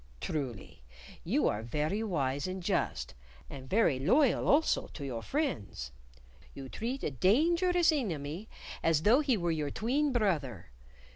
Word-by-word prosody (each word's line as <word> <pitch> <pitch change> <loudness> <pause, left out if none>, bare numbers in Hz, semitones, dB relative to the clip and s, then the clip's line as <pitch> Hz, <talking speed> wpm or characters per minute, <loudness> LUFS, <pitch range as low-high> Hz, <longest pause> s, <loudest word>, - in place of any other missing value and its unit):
Truly, 130 - -5 0.4
you - - +1
are 105 - -1
very 150 - -2
wise 145 -8 -1
and 185 0 -5
just, - - -1 0.4
and 130 -2 -9
very 195 - +3
loyal 250 - +3
also 305 +3 +3
to 145 - -6
your 120 -4 -4
friends. 115 - -3 0.6
You 135 -1 -8
treat 245 - -4
a - - -1
dangerous 335 - +3
enemy 180 - -3 0.3
as 160 -2 +2
though 230 +8 +5
he 275 -6 +2
were 170 -2 0
your 155 -3 -1
tween 270 - 0
brother. 150 - -1
175 Hz, 140 wpm, -31 LUFS, -, 0.6 s, though